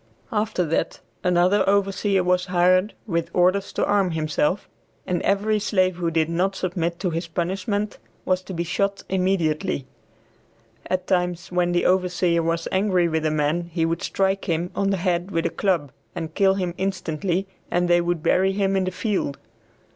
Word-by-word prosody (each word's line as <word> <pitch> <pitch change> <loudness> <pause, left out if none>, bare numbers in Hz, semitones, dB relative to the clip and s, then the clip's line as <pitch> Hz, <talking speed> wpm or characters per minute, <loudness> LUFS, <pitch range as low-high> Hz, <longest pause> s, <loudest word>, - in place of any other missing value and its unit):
After 215 -4 0
that 160 - -1 0.2
another 180 +3 +3
overseer 195 -1 +2
was 180 +1 +1
hired, 185 +3 +3
with 170 -5 -1
orders 185 +2 +2
to - - +1
arm 200 -2 +2
himself, 155 +3 0 0.4
and 180 -1 -1
every 210 +2 +1
slave 185 -3 +1
who 170 -2 0
did 160 -1 +1
not 180 +4 0
submit 170 -2 -2
to 180 -3 0
his 165 +1 -3
punishment 190 +5 -2 0.3
was 185 0 +1
to 190 - -6
be 170 - -1
shot 200 +3 -1
immediately. 185 -5 0 1.0
At 185 0 -1
times, 180 -1 -1
when 180 -1 +1
the 175 0 +1
overseer 180 -2 +2
was 165 0 -1
angry 190 -2 +2
with 160 -1 0
a - - +2
man 155 +3 0
he 165 -1 0
would 165 +1 -1
strike 195 0 0
him 170 +1 -1
on 195 0 +1
the 195 - +1
head 175 0 0
with 165 -4 -1
a - - 0
club 170 -9 0 0.2
and 160 - -5
kill 195 -1 +3
him 180 -3 -2
instantly, 185 -1 -1 0.2
and 175 0 +1
they 175 0 +4
would 170 -2 -1
bury 190 +1 +3
him 195 -1 +1
in 190 -1 +1
the - - 0
field. 185 -7 -2
180 Hz, 175 wpm, -23 LUFS, 170-195 Hz, 1.0 s, they